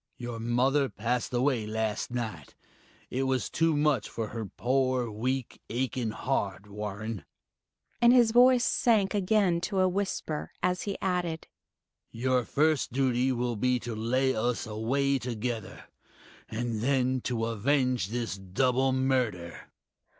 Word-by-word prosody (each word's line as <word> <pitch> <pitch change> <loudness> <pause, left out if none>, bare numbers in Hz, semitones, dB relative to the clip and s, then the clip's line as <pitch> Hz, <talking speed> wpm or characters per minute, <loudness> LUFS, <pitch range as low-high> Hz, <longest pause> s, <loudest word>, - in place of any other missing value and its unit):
"Your 120 -2 -5
mother 130 +4 +2
passed 120 +3 -2
away 125 -3 +1
last 110 -1 -2
night 110 - -5 0.6
it 130 - -1
was 130 -5 -1
too 165 -2 +2
much 145 -5 +1
for 110 -2 -4
her 115 -1 -5
poor 130 +1 0
weak, 125 +4 -3
aching 125 -1 -1
heart, 105 -4 -2
Warren," 105 -1 -5 0.8
and 235 0 +7
his 240 -3 +5
voice 245 +1 +6
sank 215 -5 +2
again 195 -3 +2
to 190 +3 -2
a 185 - +4
whisper, 185 -5 -3
as 180 0 +1
he 200 - -3
added, 180 -4 -1 0.6
"Your 125 +1 0
first 155 +2 +1
duty 130 0 +1
will 120 -1 -1
be 125 +4 +1
to 120 - -5
lay 130 +4 +1
us 120 +2 -1
away 130 +6 0
together, 120 -3 -4 0.7
and 115 -1 -3
then 130 0 +1
to 115 -3 -1
avenge 125 +1 +1
this 115 -1 -3
double 125 +8 +1
murder." 125 -10 -1
125 Hz, 135 wpm, -29 LUFS, 115-140 Hz, 0.8 s, and